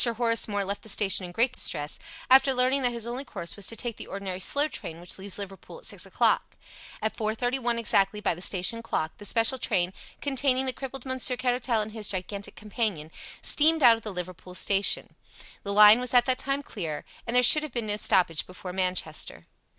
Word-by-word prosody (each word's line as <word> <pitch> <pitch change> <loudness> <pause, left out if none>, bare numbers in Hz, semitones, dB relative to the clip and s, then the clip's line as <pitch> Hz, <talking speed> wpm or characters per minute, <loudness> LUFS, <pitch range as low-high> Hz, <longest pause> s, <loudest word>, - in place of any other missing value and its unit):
Horace 230 -1 +1
Moore 205 -2 -1
left 200 +1 -4
the 220 - -10
station 195 -2 +3
in - - -10
great 235 +7 +2
distress, 145 0 -1 0.3
after 265 +1 +5
learning 255 +2 +3
that 245 -1 +2
his 235 -2 -4
only 245 +3 -4
course 170 -10 -6
was 200 -2 -4
to 230 - -4
take 230 0 -4
the - - -9
ordinary 195 -2 -5
slow 290 +8 +1
train 165 - -6
which 175 +2 -6
leaves 195 0 -5
Liverpool 195 - -9
at - - -12
six - - -3
o'clock. - - 0 0.5
At 220 - -1
four 215 0 -2
thirty 245 +3 -1
one 240 -2 0
exactly 210 -2 +1
by 210 -3 +1
the 170 - -10
station 190 +5 +2
clock 160 -8 -3
the 205 - -7
special 230 +5 +3
train, 185 -5 0 0.3
containing 270 -2 +1
the 260 - 0
crippled 270 0 -7
Monsieur 260 -1 +1
Caratal 245 -2 0
and 215 - -8
his 215 -2 -3
gigantic 200 +1 -5
companion, 210 -8 -3 0.3
steamed 315 0 +4
out 235 -2 +8
of 225 - -10
the 215 - -5
Liverpool 180 0 -7
station. 200 +1 +1 0.5
The 200 - -5
line 210 +2 +8
was 250 0 -1
at 245 -1 +6
that 255 -1 0
time 275 +1 -2
clear, 165 - -6 0.2
and 235 - -2
there 250 - +6
should 305 +5 +7
have 305 - -6
been 235 -2 -2
no 205 -1 -1
stoppage 175 -6 +2
before 180 0 -9
Manchester. 180 -4 -3
220 Hz, 210 wpm, -26 LUFS, 190-250 Hz, 0.5 s, out